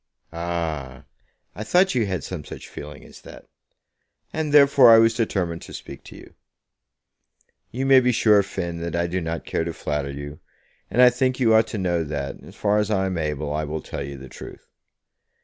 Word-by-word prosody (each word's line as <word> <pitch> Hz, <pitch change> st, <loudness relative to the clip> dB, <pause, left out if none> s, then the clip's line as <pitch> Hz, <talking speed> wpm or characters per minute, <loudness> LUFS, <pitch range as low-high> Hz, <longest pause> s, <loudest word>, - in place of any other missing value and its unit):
"Ah! 80 Hz, -6 st, -4 dB, 0.5 s
I 105 Hz, -, -6 dB
thought 180 Hz, -, +3 dB
you 120 Hz, -5 st, +1 dB
had 95 Hz, -2 st, -3 dB
some 90 Hz, -5 st, -6 dB
such -, -, -10 dB
feeling 75 Hz, +1 st, -10 dB
as -, -, -15 dB
that, -, -, -13 dB, 0.9 s
and 160 Hz, -2 st, -2 dB
therefore 140 Hz, -3 st, +7 dB
I 115 Hz, -, +9 dB
was 115 Hz, 0 st, +5 dB
determined 95 Hz, -7 st, -2 dB
to -, -, -10 dB
speak -, -, -10 dB
to -, -, -12 dB
you. -, -, -14 dB, 1.4 s
You 130 Hz, +3 st, -3 dB
may 135 Hz, -1 st, +7 dB
be 125 Hz, -1 st, +2 dB
sure, 105 Hz, -3 st, +4 dB
Finn, 85 Hz, -3 st, -5 dB
that 85 Hz, 0 st, -4 dB
I 85 Hz, 0 st, 0 dB
do 90 Hz, +2 st, -2 dB
not 80 Hz, 0 st, -4 dB
care -, -, -1 dB
to -, -, -4 dB
flatter 75 Hz, -2 st, -3 dB
you, 70 Hz, +2 st, -8 dB, 0.5 s
and 125 Hz, +3 st, +4 dB
I 125 Hz, -, +7 dB
think 130 Hz, +1 st, 0 dB
you 115 Hz, -3 st, +4 dB
ought 110 Hz, 0 st, +4 dB
to 110 Hz, -, -5 dB
know 90 Hz, -3 st, 0 dB
that, 70 Hz, -3 st, -5 dB
as -, -, -14 dB
far 105 Hz, 0 st, +1 dB
as 105 Hz, 0 st, -1 dB
I 95 Hz, -3 st, +1 dB
am 95 Hz, -2 st, -2 dB
able, 75 Hz, -1 st, -3 dB
I 75 Hz, +1 st, -1 dB
will 75 Hz, +1 st, -5 dB
tell -, -, -6 dB
you 70 Hz, 0 st, -7 dB
the 65 Hz, 0 st, -10 dB
truth. 65 Hz, -, -11 dB
90 Hz, 200 wpm, -23 LUFS, 75-115 Hz, 1.4 s, I